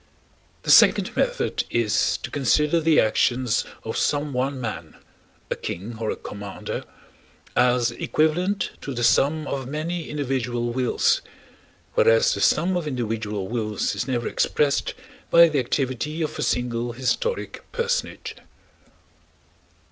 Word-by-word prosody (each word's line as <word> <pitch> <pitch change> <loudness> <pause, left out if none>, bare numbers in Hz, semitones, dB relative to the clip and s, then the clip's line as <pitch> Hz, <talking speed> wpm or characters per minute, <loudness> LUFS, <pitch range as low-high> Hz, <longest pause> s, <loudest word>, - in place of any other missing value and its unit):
The - - +1
second - - +6
method - - 0
is 115 -3 +1
to - - -5
consider 150 +4 +2
the 160 -1 +4
actions 120 +2 +2 0.2
of 110 - -4
some 145 -1 0
one 130 +2 -1
man—a 85 -10 -8
king 110 +6 -6
or 110 -1 -2
a - - -1
commander—as 120 +4 -3
equivalent 180 +6 0
to 140 - -5
the 120 - -2
sum 150 +6 +3
of 135 -2 -4
many 160 +4 -4
individual 125 -4 -2
wills; 455 - +2 0.7
whereas 485 +1 +4
the - - -3
sum 185 +2 +3
of 175 -3 -2
individual 110 -6 -3
wills 110 -2 -2
is - - -3
never 120 -3 -1
expressed 145 -1 0 0.3
by 170 0 +8
the 150 -3 +1
activity 135 +5 -1
of 155 - -4
a - - -1
single 120 -1 -1
historic 135 - -2
personage. 480 0 -2
130 Hz, 125 wpm, -24 LUFS, 120-160 Hz, 0.7 s, by